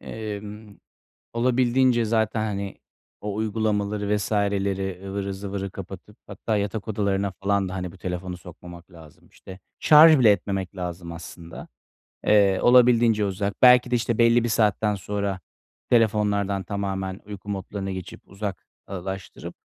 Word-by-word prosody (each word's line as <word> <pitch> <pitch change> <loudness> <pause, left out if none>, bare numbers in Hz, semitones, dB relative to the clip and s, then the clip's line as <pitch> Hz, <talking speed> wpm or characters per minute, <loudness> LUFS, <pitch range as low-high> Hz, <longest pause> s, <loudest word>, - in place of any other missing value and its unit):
emm, 105 -1 -7 0.6
olabildiğince 125 0 +2
zaten, 110 0 0
hani, 100 -2 -4 0.4
o 105 -1 -4
uygulamaları 105 -1 -1
vs.leri, 100 -2 -1
ıvırı 100 0 -3
zıvırı 100 0 -5
kapatıp - - -10
hatta 110 -2 -3
yatak 105 +2 -3
odalarına 100 -2 -1
falan 100 -1 +1
da, 95 - -6
hani, 90 -2 -5
bu 95 - -16
telefonu 90 0 -5
sokmamak 90 0 -13
lazım, 80 -4 -16
işte. 95 0 -13 0.2
Şarj 155 0 +8
bile 115 -4 +6
etmemek 95 -1 -1
lazım 90 -1 -5
aslında. 85 0 -10 0.6
Eee, 100 -2 +4
olabildiğince 120 -3 +5
uzak. 100 +1 -2
Belki 125 0 +6
de, - - +3
işte, 120 -1 -1
belli 115 0 +4
bir 120 - -1
saatten 105 -1 +1
sonra 100 0 -3 0.5
telefonlardan 105 -4 +2
tamamen 95 -1 -4
uyku 105 0 -9
modlarına 95 0 -4
geçip 95 -2 -8
uzak 100 -1 -6 0.2
ııı, 95 -2 -6
laştırıp, 95 -1 -7
100 Hz, 135 wpm, -24 LUFS, 95-110 Hz, 0.6 s, Şarj